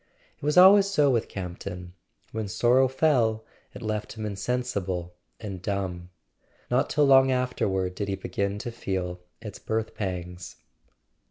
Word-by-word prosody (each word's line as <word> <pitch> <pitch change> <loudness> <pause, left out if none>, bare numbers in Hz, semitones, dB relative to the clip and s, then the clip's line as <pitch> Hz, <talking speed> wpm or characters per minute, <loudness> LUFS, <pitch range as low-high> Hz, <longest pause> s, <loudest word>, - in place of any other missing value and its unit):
It - - -21
was 150 +3 +1
always 195 +2 +8
so 150 -8 +3
with 115 -2 0
Campton: 90 -1 -7 0.4
when 110 -1 -3
sorrow 125 +6 +3
fell 125 -6 +1 0.3
it - - -8
left 110 -1 -3
him 110 -1 -6
insensible 100 -5 -3 0.3
and 100 -5 -6
dumb. 95 -3 -3 0.6
Not 125 - +2
till 150 -1 +3
long 135 -1 +6
afterward 100 -8 0
did 100 +2 -4
he 100 - -1
begin 100 +1 -3
to 120 - -3
feel 95 -5 -3 0.2
its 105 -3 -8
birth 110 0 -2
pangs. 90 -2 -5
105 Hz, 145 wpm, -26 LUFS, 95-125 Hz, 0.6 s, always